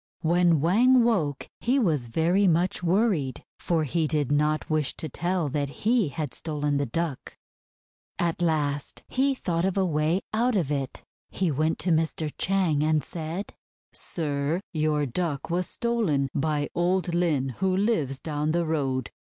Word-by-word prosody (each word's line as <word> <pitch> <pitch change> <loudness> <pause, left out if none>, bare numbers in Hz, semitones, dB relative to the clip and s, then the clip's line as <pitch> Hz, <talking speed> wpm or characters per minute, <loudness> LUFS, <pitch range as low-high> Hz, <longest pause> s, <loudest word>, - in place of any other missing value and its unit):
When 170 -2 +3
Wang 240 - +5
woke, 165 - 0
he 250 +4 +1
was 155 - +1
very 170 - +2
much 175 +2 +1
worried, 175 - +1 0.2
for 165 -2 0
he 155 +2 0
did 150 -3 0
not 150 +1 +1
wish 155 -4 0
to 160 - -4
tell 175 +3 -1
that 140 0 -1
he 220 - +1
had 150 +1 -4
stolen 150 -2 -1
the 140 -1 -1
Duck. 155 +2 -4 0.8
At 170 -1 -1
last 145 -4 -1
he 270 +1 +1
thought 170 -8 -1
of 190 +1 0
a 190 - +3
way 160 +2 +1
out 235 +2 +2
of 165 -8 0
it. 135 -2 -3 0.3
He 185 -4 0
went 155 +3 0
to 180 - +2
Mr. 160 -1 0
Chang 180 -6 +2
and 155 -1 +2
said: 170 +4 -5 0.3
— - - -54
"Sir, 150 0 -1
your 150 -2 +1
Duck 145 +2 -3
was 180 +1 +1
stolen 210 - 0
by 145 0 0
old 175 0 +1
Lin 160 -6 +1
who 190 0 +1
lives 160 - 0
down 150 0 -2
the 170 0 +1
road. 135 -6 -1
160 Hz, 160 wpm, -26 LUFS, 145-180 Hz, 0.8 s, Wang